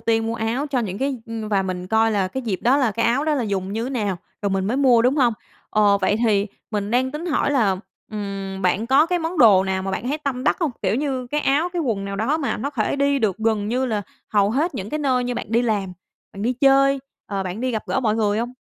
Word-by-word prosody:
tiên 225 -1 +1
mua 225 - -2
áo 235 +6 -1
cho 275 -3 -1
những 200 -4 -3
cái 270 -1 -1
ừm, 225 -1 -5
và 200 -2 +2
mình 180 -1 -4
coi 220 +3 +3
là 195 -3 +1
cái 265 +7 -5
dịp 215 -6 -1
đó 250 +4 +4
là 255 -6 +2
cái 230 +2 0
áo 250 +5 +1
đó 310 -1 +1
là 270 - 0
dùng 195 -3 -2
như 225 +3 -2
nào, 210 -8 -1 0.3
rồi 200 - 0
mình 190 0 0
mới 235 +5 0
mua, 255 -4 +5
đúng 255 +4 +2
hông? 245 -5 +3 0.4
Ờ, 205 -1 +4
vậy 205 - +1
thì 205 -3 +2 0.2
mình 205 -1 -2
đang 255 +2 +1
tính 300 +5 -5
hỏi 295 -2 +1
là, 215 -9 +2 0.3
ừm, 195 -2 -5
bạn 185 +5 +1
có 275 +5 +5
cái 355 +1 0
món 330 +1 -3
đồ 205 -7 +7
nào 190 0 -1
mà 195 - -3
bạn 210 +6 -3
thấy 295 +3 -1
tâm 270 -4 -3
đắc - - +3
hông, 325 - +1
kiểu 195 - +1
như, 260 -2 -2
cái 300 +4 -1
áo 295 +5 +2
cái 350 -2 -1
quần 220 -8 -1
nào 200 0 -4
đó 230 +9 +1
mà 280 - -1
nó 280 - -3
thể 250 -2 -1
đi 280 0 +2
được 210 -7 0
gần 220 -2 0
như 255 +3 0
là 215 -4 -1 0.3
hầu 205 -1 +2
hết 295 +8 0
những 205 -3 -5
cái 305 - -2
nơi 260 -4 +1
như 245 0 -2
bạn - - -4
đi 230 +2 +2
làm, 205 -5 -1 0.4
bạn 195 - -7
đi 240 +3 +1
chơi, 275 +1 +4 0.3
ờ, 195 -2 -2
bạn 185 +3 -5
đi 255 +1 0
gặp 220 -3 -2
gỡ - - 0
mọi 220 -4 +1
người 210 -1 +1
hông? 240 +2 -3
230 Hz, 275 wpm, -22 LUFS, 205-270 Hz, 0.4 s, đồ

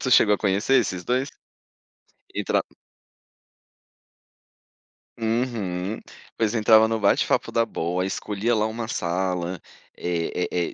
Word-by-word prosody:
tu 130 - -1
chegou 105 -4 +6
a - - -3
conhecer 100 +6 +1
esses 95 -5 -3
2? 130 +3 0 1.1
Entra - - +1 2.5
Uhum. 110 -5 -2 0.4
Pois 110 -2 +1
entrava 110 0 +6
no 115 0 -1
bate-papo 100 -1 +2
da 115 0 +2
bol, 90 -2 -2
escolhia 105 +4 -1
lá 105 0 +2
uma 110 +1 -4
sala, 90 -4 -2 0.4
é 90 0 -1
é 90 -1 0
é, - - -16
105 Hz, 115 wpm, -24 LUFS, 90-115 Hz, 2.5 s, chegou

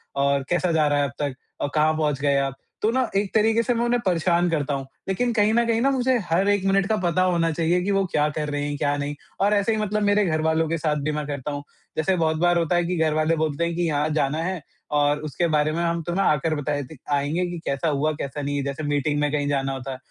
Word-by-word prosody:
और 140 0 +1
कैसा 175 0 +1
जा 155 -2 +3
रहा 145 0 +2
है 140 - +2
अब 135 - -4
तक? 145 -3 -1 0.3
अ, - - +1
कहाँ 155 +1 +3
पहुँच 150 -3 0
गए 140 -1 +2
आप? 135 -1 -1 0.3
तो 215 - +2
ना 260 0 +1
एक 200 -1 0
तरीके 225 +1 +3
से 245 - +1
मैं 235 0 0
उन्हें 240 0 +2
परेशान 175 0 +2
करता 150 -3 -1
हूँ। 135 -1 -3 0.2
लेकिन 240 +6 0
कहीं 215 0 +3
न 235 0 +3
कहीं 230 0 +1
मुझे 260 -2 +2
हर 190 +4 +3
1 200 -1 +1
मिनट 195 0 +2
का 220 - +2
पता 175 +1 +2
होना 170 -2 +2
चाहिए 170 +3 +1
कि 200 +2 -1
वो 195 -1 +2
क्या 150 0 +2
कर 150 0 -3
रहे 145 0 -2
हैं? 145 0 -3
क्या 145 +1 0
नहीं 145 +1 -3 0.3
और 205 +1 +3
ऐसे 205 +2 +2
ही 220 - 0
मतलब 210 0 -1
मेरे 205 0 +3
घरवालों 160 0 +1
के 165 - 0
साथ 150 -1 0
भी 155 - 0
मैं 150 -1 -3
करता 145 0 -4
हूँ। 145 0 -5 0.3
जैसे 185 +4 +2
बहुत 160 -1 +1
बार 175 +1 +3
होता 170 +1 +1
है 175 - +2
कि 180 0 -1
घरवाले 155 +1 +2
बोलते 155 +1 -1
हैं 170 0 -1
कि 175 - -1
यहाँ 150 0 0
जाना 150 -1 0
है 185 -2 -3 0.3
और 145 0 +2
उसके 160 +3 -1
बारे 155 -1 +2
में 170 +2 -1
हम 170 0 0
तुम्हें 175 +4 0
आकर 155 +2 +1
बता 150 0 -2
देते 145 +1 -6 0.2
आएँगे 145 +6 0
कि 175 - -5
कैसा 140 +4 -1
हुआ 150 +2 +1
कैसा 140 +1 -4
नहीं 140 0 -2
जैसे 140 +2 -4
मीटिंग 145 0 0
में 150 -1 +1
कहीं 145 -1 0
जाना 135 -1 0
होता 135 0 -5
है। 130 - -5
160 Hz, 265 wpm, -24 LUFS, 145-185 Hz, 0.3 s, जा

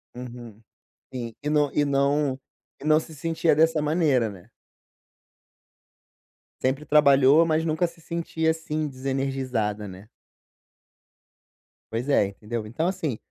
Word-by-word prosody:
Uhum, 120 -3 -9 0.5
sim, 120 -3 -5
e 150 - -3
não 150 -2 +2
e 145 - +2
não 140 -1 +1 0.4
e - - -11
não 155 0 +4
se 160 0 -11
sentia 165 +2 +1
dessa 160 0 +3
maneira, 150 -6 +2
né. 95 -4 -12 2.1
Sempre 135 +3 0
trabalhou, 140 +1 +5
mas 160 0 +1
nunca 160 +2 +1
se 170 0 -8
sentia 160 -1 -2
assim 155 -1 -3
desenergizada, 130 -6 -2
né. 95 +3 -11 1.8
Pois 120 +5 -3
é, 105 -8 +4
entendeu. 105 +3 -6
Então, 155 +10 -1
assim, 165 - -2
140 Hz, 120 wpm, -25 LUFS, 120-155 Hz, 2.1 s, trabalhou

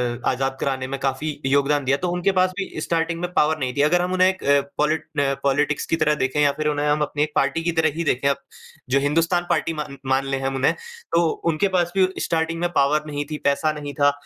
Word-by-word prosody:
अ, 120 - -12
आज़ाद 135 +1 -1
कराने 130 -2 -2
में 135 0 -4
काफ़ी 140 +3 -2
योगदान 140 +1 +2
दिया, 135 +2 +2
तो 180 - -2
उनके 180 +2 +1
पास 185 -1 +3
भी 190 - -4
स्टार्टिंग 165 0 -1
में 180 0 -3
पॉवर 155 -2 +2
नहीं 125 -2 -2
थी। 140 - +3
अगर 175 +4 +3
हम 180 +1 -1
उन्हें 185 0 +4
एक 190 0 -2
अ, 140 0 +4 0.2
पॉलिट 155 +1 +1
न 140 -1 +1
पॉलिटिक्स 145 +1 +1
की - - 0
तरह 155 -1 +2
देखें 135 0 -1
या 145 -1 +4
फिर 155 - -1
उन्हें 150 0 0
हम 150 +1 +1
अपनी 150 0 0
एक 155 - -3
पार्टी 165 - +1
की 170 - +1
तरह 160 -1 +2
ही 170 - -2
देखें 140 -3 +1
अब, 140 - +1 0.5
जो 135 +2 +3
हिंदुस्तान 165 +5 +1
पार्टी 165 - +1
मा 150 -1 -4 0.2
मान 135 +1 +1
लें 135 0 -2
हम 135 0 -2
उन्हें, 135 0 +2 0.4
तो 170 0 +3 0.2
उनके 165 +6 +1
पास 175 -1 +1
भी 185 -1 +5
स्टार्टिंग 165 0 -1
में 175 - +1
पॉवर 145 +2 +3
नहीं 145 0 -3
थी, 150 - -2
पैसा 140 +2 +2
नहीं 145 -1 -6
था, 145 0 +3
150 Hz, 250 wpm, -22 LUFS, 140-165 Hz, 0.5 s, भी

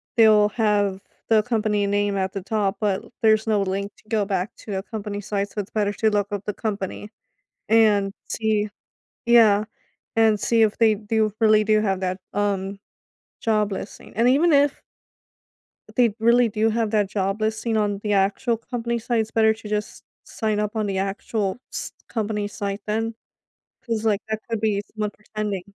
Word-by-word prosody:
they'll 215 -2 +6
have 205 -3 +1 0.3
the 220 -1 +5
company 210 -3 0
name 205 0 +1
at 190 0 -1
the 195 - -4
top 205 -1 -1
but 205 -3 0 0.2
there's 220 0 +4
no 210 -2 +2
link 200 +2 -3
to - - -25
go 215 -3 +1
back 195 -1 -2
to 200 -3 -6
a 190 - -3
company 210 -2 -5
site 200 0 -2
so 210 - -6
it's 200 - -5
better 205 -2 0
to 220 +2 +1
look 205 0 0
up 205 -1 -4
the 210 - -2
company 205 -1 -4 0.6
and 210 -3 +4 0.2
see 215 -2 0 0.6
Yeah, 220 -3 +5 0.5
and 220 -2 +4
see 230 +2 +2
if 215 -2 +3
they 225 -2 +4
do 215 0 0
really 215 -1 +5
do 215 0 +3
have 195 -3 0
that, 185 0 -2
um, 200 -1 -1 0.6
job 215 -2 +1
listing. 195 - -7
And 230 +2 +3
even 310 +7 +4
if 285 0 +3 1.2
they 235 -5 +3
really 235 +1 +5
do 220 +1 +1
have 225 -1 0
that 210 -2 +2
job 195 +1 -1
listing 220 +1 -1
on 205 -2 0
the 210 - -1
actual 205 +5 +1
company 235 +1 -3
site, 235 0 0
it's 220 0 -2
better 220 -1 +4
to 220 -1 -10
just 210 0 -3 0.2
sign 215 -2 -2
up 210 +1 -3
on 215 -1 0
the 195 -1 -2
actual 195 +1 -2
s - - -5 0.2
company 210 -2 -2
site, 200 0 -4
then. 225 +2 -1 0.7
'Cause 225 -2 -2
like 210 -2 +2
that 220 0 -2
could 225 -2 -2
be 205 -2 +1
someone 210 -1 -2
pretending. 210 -2 -4
210 Hz, 180 wpm, -23 LUFS, 200-220 Hz, 1.2 s, they'll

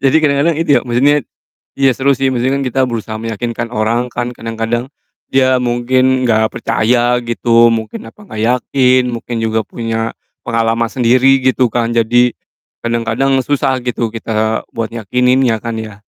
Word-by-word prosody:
Jadi 135 - +4
kadang-kadang 145 +2 +2
itu 165 -1 -2
ya, - - -5
maksudnya 125 +5 +3 0.6
iya, 135 -1 +4
seru 140 +1 +2
sih, 135 -1 0
maksudnya 130 +3 0
kan - - -1
kita 130 +1 0
berusaha 110 -2 -4
meyakinkan 115 +1 -4
orang 115 +3 0
kan, 120 +1 -3
kadang-kadang 115 +2 -3 0.4
dia 130 -1 +2
mungkin 130 +1 +1
nggak 110 -2 +2
percaya 120 +2 +1
gitu, 115 0 +3
mungkin 115 - -3
apa - - -16
nggak 110 - -7 0.2
yakin, 130 -2 +3
mungkin 120 0 -5
juga 110 0 0
punya 115 -1 -3 0.3
pengalaman 115 0 0
sendiri 130 +3 +3
gitu 130 -1 +2
kan. 115 +1 -1
Jadi, 120 +1 +3 0.5
kadang-kadang 115 +3 0
susah 135 -2 0
gitu 120 -2 -1
kita 110 -1 -1
buat 115 -1 -3
yakininnya 125 +1 +1
kan 115 0 -5
ya? 110 -2 -6
120 Hz, 155 wpm, -15 LUFS, 115-130 Hz, 0.6 s, Jadi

